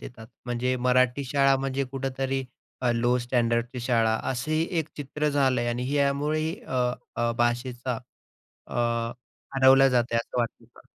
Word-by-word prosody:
देतात. 110 -3 -10 0.2
म्हणजे 125 +1 0
मराठी 125 +2 +2
शाळा 135 +1 +3
म्हणजे 135 0 -1
कुठेतरी 135 0 -2 0.5
लो 120 +1 +2
स्टँडर्डची 120 0 0
शाळा 115 -2 +2 0.2
असंही 155 +6 0
एक 160 - -1
चित्र 150 +1 -2
झालं 130 -4 +2
आणि 125 +3 -2
यामुळेही 145 +3 +1
अ, - - -7 0.4
अ, 120 0 +1
भाषेचा 120 0 -1 0.7
अ, - - -9 0.8
हरवला 135 0 +7
जात 125 -2 +3
आहे 115 - +2
असं 115 +1 -2
वाटतं 120 -1 -3
का? - - -15
130 Hz, 135 wpm, -26 LUFS, 120-135 Hz, 0.8 s, हरवला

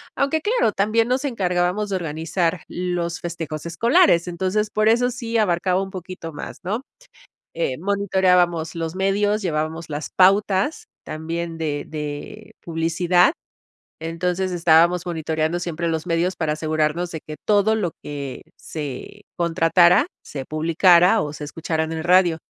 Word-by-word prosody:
Aunque 280 +3 +1
claro, 425 - +2
también 215 +4 +1
nos 260 +3 0
encargábamos 190 -3 0
de 190 - 0
organizar 165 +2 -2
los 175 -1 -3
festejos 165 -2 -5
escolares. 185 - +3
Entonces 190 +4 -1
por 215 0 +1
eso 245 +2 +3
sí 235 -2 -3
abarcaba 185 -2 +1
un 190 - -8
poquito 180 -3 -7
más, 145 - -8
¿no? 210 +7 -2 0.7
Eh: 155 -6 -2
"Monitoreábamos 180 -4 +1
los 165 +1 -3
medios, 205 +2 +1
llevábamos 160 -1 -3
las 150 +1 -4
pautas 200 - +3 0.2
también 165 +1 -5
de 145 -3 -2
de 150 -2 -7
publicidad" 170 - +2 0.7
Entonces 180 +3 -2
estábamos 170 +1 +4
monitoreando 160 0 -1
siempre 170 -1 -3
los 160 0 -2
medios 175 +2 0
para 160 -3 -1
asegurarnos 155 +2 -1
de 160 - -6
que 155 -1 -8
todo 210 +1 +3
lo 185 -7 -1
que 140 -2 -6 0.2
se 150 +6 -7 0.2
contratara 170 - +4 0.2
se 135 -2 -7
publicara 170 +5 +4
o 145 - -3
se 150 -1 -7
escuchara 160 +1 -2
en 160 - -5
el 160 - -4
radio. 175 -1 +4
175 Hz, 140 wpm, -22 LUFS, 160-195 Hz, 0.7 s, estábamos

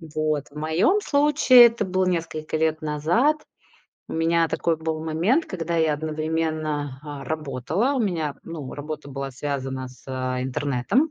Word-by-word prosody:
вот 155 -2 0
в - - -19
моем 160 - +2
случае 285 -6 +6
это 230 -2 -2
было 185 0 0
несколько 165 -3 -2
лет 160 0 +1
назад. 160 - +2 0.7
У - - -7
меня 165 0 +2
такой 165 0 0
был 160 0 -3
момент, 175 - +2
когда 170 -2 -3
я 160 -2 +3
одновременно, 155 -2 -2
а, 145 -2 -7
работала. 155 - -1
У 265 - 0
меня, 165 -9 -1
ну, 155 -5 -7
работа 150 0 -6
была 135 0 -4
связана 135 -1 -4
с, 125 0 -17
а, 130 -1 -2
интернетом. 140 - 0
155 Hz, 150 wpm, -24 LUFS, 145-170 Hz, 0.7 s, случае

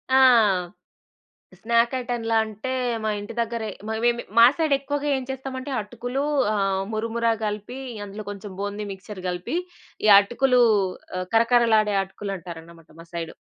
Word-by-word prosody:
ఆ! - - +7 1.4
స్నాక్ 235 +2 +2
ఐటం‌లా 235 -2 -2
అంటే, 220 +4 -5 0.3
మా 215 - 0
ఇంటి 205 +2 -7
దగ్గరే, 230 -1 -2 0.2
మా - - -1
వేమి 240 0 +2 0.2
మా 230 - +10
సైడెక్కువగా 290 -2 0
ఏం 265 - -3
చేస్తామంటే 265 +1 -5
అటుకులూ, 245 +6 -4 0.3
ఆహ్, 195 -2 0
మురుమురా 230 +1 0
కలిపి 210 +4 -4 0.3
అందులో 205 +1 -7
కొంచం 200 0 -8
బూంది 205 +1 -3
మిక్చర్ 190 0 -8
గలిపి, 180 - -3 0.5
ఈ - - +4
అటుకులూ 245 +5 +2 0.6
ఆహ్, 185 - -3
కరకరలాడే 230 -2 +4
అటుకులు 195 +1 -6
అంటారనమాట 165 -1 -11
మా 165 - -11
సైడు. 165 -1 -5
220 Hz, 135 wpm, -24 LUFS, 200-245 Hz, 1.4 s, మా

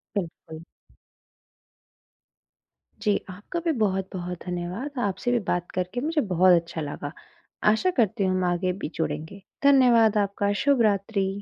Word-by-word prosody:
बिल्कुल। 165 -4 -5 2.4
जी, 210 -2 +2
आपका 205 - -5
भी 330 - +3
बहुत-बहुत 190 -3 -2
धन्यवाद, 180 +10 -4 0.2
आपसे 245 +6 -2
भी 240 - +2
बात 175 0 -1
करके 185 +6 -3
मुझे 310 +1 +1
बहुत 180 +1 +6
अच्छा 170 -1 -7
लगा, 145 0 -5 0.5
आशा 220 +12 +3
करती 215 -2 +2
हूँ 185 - +2
हम 185 - 0
आगे 180 +1 0
भी - - -3
जुड़ेंगे। 160 +4 -4 0.2
धन्यवाद 245 -6 +5
आपका, 200 0 0
शुभ 280 -4 +3
रात्रि। 200 0 -1
195 Hz, 130 wpm, -25 LUFS, 180-230 Hz, 2.4 s, बहुत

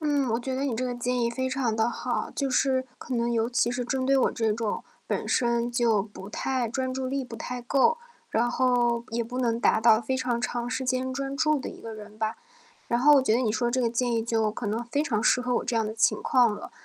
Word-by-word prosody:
嗯， 290 -4 +1
我 225 - +1
觉 260 +2 -4
得 265 - -2
你 270 -5 -1
这 255 - -1
个 250 -1 -2
建 245 +1 -1
议 235 - +2
非 260 +2 -2
常 255 -4 0
地 225 +1 +1
好， 245 +1 -3
就 275 - -1
是 260 0 +1
可 255 - -4
能 235 0 0
尤 230 0 0
其 240 -1 +2
是 245 0 -2
针 260 +1 -1
对 275 +1 +4
我 265 - +3
这 225 -3 0
种 220 0 -3 0.2
本 - - -2
身 235 0 +1
就 235 -3 +3
不 200 -1 -9
太 255 0 -1
专 260 +2 -2
注 260 0 -2
力 275 0 -2
不 240 - -9
太 245 +2 -5
够， 275 - +2 0.3
然 235 +2 +2
后 240 -1 +2
也 235 +1 -1
不 250 +2 -6
能 235 -2 +1
达 235 - +3
到 220 -1 +5
非 260 +3 -2
常 250 -2 -1
长 240 0 -2
时 260 - -2
间 255 0 -1
专 275 +1 -3
注 305 0 +2
的 265 - -5
一 - - -10
个 225 - -7
人 210 0 -11
吧。 220 0 -2 0.5
然 235 - 0
后 295 +3 +7
我 280 - +6
觉 220 -4 +2
得 240 - +2
你 235 -4 +1
说 235 +3 0
这 260 - +1
个 235 -2 +1
建 240 +1 0
议 225 - +1
就 225 -2 0
可 220 - -5
能 225 +3 -2
非 280 +5 -1
常 235 -9 0
适 245 +2 +3
合 250 0 -2
我 - - -1
这 - - -2
样 225 -1 +2
的 215 - -3
情 230 +2 +2
况 240 -4 +3
了， - - -9
240 Hz, 285 characters per minute, -27 LUFS, 230-260 Hz, 0.5 s, 后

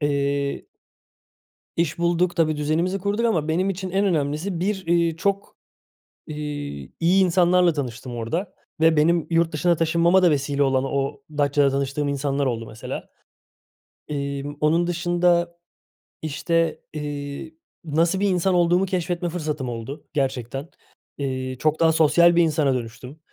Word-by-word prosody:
Eee 140 -1 -1 1.1
iş 165 -2 0
bulduk, 175 +1 +1
tabii, 160 -3 +2
düzenimizi 165 +6 0
kurduk 205 +4 0
ama 165 -10 +1
benim 180 +5 +1
için 190 0 -4
en 195 +2 +1
önemlisi 165 +1 -1
bir, 190 +1 -2
eee, 170 -1 +2
çok, 200 +3 -2 0.7
iii, 145 - -6
iyi 180 +3 +4
insanlarla 180 -1 +4
tanıştım 125 -3 -5
orada 140 - -3 0.3
ve 160 0 +4
benim 165 +1 +3
yurt 165 -1 +2
dışına 170 +3 +2
taşınmama 170 +3 +3
da 175 - +5
vesile 140 0 +1
olan 135 -1 +2
o 140 +1 -2 0.2
Datça'da 145 -1 +3
tanıştığım 140 +1 -1
insanlar 140 0 -1
oldu, 115 -3 -2
mesela. 110 0 -7 1.0
Emm, 140 0 -4
onun 165 +3 +3
dışında, 175 0 +1 0.7
işte, 165 +2 0
eee, 145 0 -5 0.3
nasıl 165 +4 +1
bir 200 0 +2
insan 185 0 +1
olduğumu 175 +2 +3
keşfetme 175 -1 -2
fırsatım 150 -6 -3
oldu 120 +5 -7
gerçekten. 135 +1 -2 0.5
Eee, 130 -2 -3
çok 155 0 +1
daha 165 -1 +5
sosyal 170 +2 +5
bir 170 - +5
insana 150 -4 +2
dönüştüm. 125 +4 -6
155 Hz, 135 wpm, -23 LUFS, 140-175 Hz, 1.1 s, da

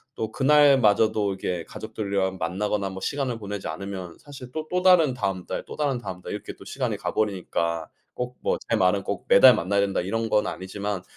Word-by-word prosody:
또 110 -1 -3
그날마저도 120 -8 +4
이게 90 -2 -3
가족들이랑 100 -4 -3
만나거나 100 +3 -1
뭐 95 0 -7
시간을 135 -5 -2
보내지 100 -2 -5
않으면 90 +1 -6
사실 135 -4 -11
또 155 +3 -5
또 180 0 0
다른 180 -7 +5
다음 95 -7 -3
달, - - -4
또 - - -9
다른 145 -4 0
다음 90 -6 -7
달 - - -6
이렇게 105 - -6
또 - - -13
시간을 - - -2
가 - - -4
버리니까 90 -5 -1 0.3
꼭 125 0 -4
뭐 - - 0
제 - - +3
말은 95 +1 +2
꼭 100 - -4
"매달 125 +4 +8
만나야 100 0 0
된다." 100 -1 0
이런 115 +5 -2
건 105 0 +2
아니지만 95 +1 -4
105 Hz, 400 characters per minute, -25 LUFS, 95-125 Hz, 0.3 s, 매달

